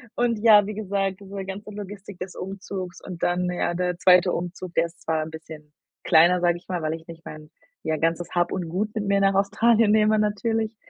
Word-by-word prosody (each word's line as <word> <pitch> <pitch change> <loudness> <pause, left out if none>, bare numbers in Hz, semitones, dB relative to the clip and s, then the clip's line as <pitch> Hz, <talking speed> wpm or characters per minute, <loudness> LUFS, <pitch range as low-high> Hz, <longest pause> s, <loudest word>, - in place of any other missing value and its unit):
Und 235 -3 0
ja, 210 -2 +6
wie 215 - -4
gesagt, 195 -2 -2
diese 195 0 -7
ganze 205 +2 -7
Logistik 200 -1 -9
des 180 0 -7
Umzugs 190 -1 -6
und 180 -3 -8
dann, 180 +1 +1
ja, 175 -1 -1
der 180 0 -1
2. 180 0 +5
Umzug, 180 0 -5
der 170 - +2
ist 170 - -21
zwar 160 -1 0
'n 160 - -7
bisschen 160 -2 -11 0.3
kleiner, 175 +1 +5
sag 175 -1 +2
ich 175 - -18
mal, 180 -3 -2
weil 155 +1 -1
ich 165 +1 -13
nicht 165 0 -11
mein, 155 0 -10 0.3
ja, 155 - 0
ganzes 165 +2 -1
Hab 175 0 +1
und 175 -3 -3
Gut 210 +5 -2
mit 215 - -2
mir 200 0 +2
nach 195 0 +3
Australien 215 +2 +3
nehme 215 0 +4
natürlich. 220 +2 -1
185 Hz, 215 wpm, -24 LUFS, 175-205 Hz, 0.3 s, ja